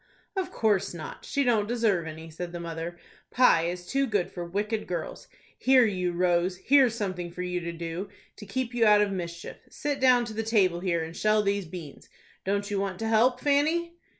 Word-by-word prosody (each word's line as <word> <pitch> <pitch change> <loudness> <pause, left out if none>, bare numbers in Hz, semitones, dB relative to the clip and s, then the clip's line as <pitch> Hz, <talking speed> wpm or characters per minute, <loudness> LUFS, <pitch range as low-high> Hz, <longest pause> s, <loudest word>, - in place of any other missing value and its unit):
"Of 380 -1 -2
course 205 -5 +1
not. 155 - -8
She 280 - 0
don't 225 -5 +2
deserve 215 -8 +1
any," 160 +1 -8
said 175 +2 -6
the 175 - -5
mother. 170 +1 -5 0.3
"Pie 245 -10 +4
is 180 +1 -5
too 275 +7 0
good 205 -6 0
for 175 - -5
wicked 210 +5 -2
girls. 170 -3 -5 0.3
Here, 260 -2 +5
you 180 -4 -1
Rose, 175 +1 +1
here's 260 +2 +4
something 185 -5 -3
for 180 +1 -6
you 180 0 -2
to 170 -1 -4
do, 170 +3 -5 0.3
to 210 - -10
keep 245 +4 -3
you 240 -1 +2
out 210 0 +6
of 205 - -1
mischief. 170 -2 -6
Sit 290 -2 -3
down 250 -2 +5
to 225 - -7
the 220 - -2
table 200 -6 +2
here, 175 -3 0
and 165 +1 -8
shell 215 0 +2
these 200 -1 0
beans. 160 -4 -10 0.3
Don't 200 +1 -1
you 200 - 0
want 195 -1 -2
to 225 - -3
help, 245 +3 +3
Fanny?" 315 +4 +1
200 Hz, 205 wpm, -27 LUFS, 175-230 Hz, 0.3 s, out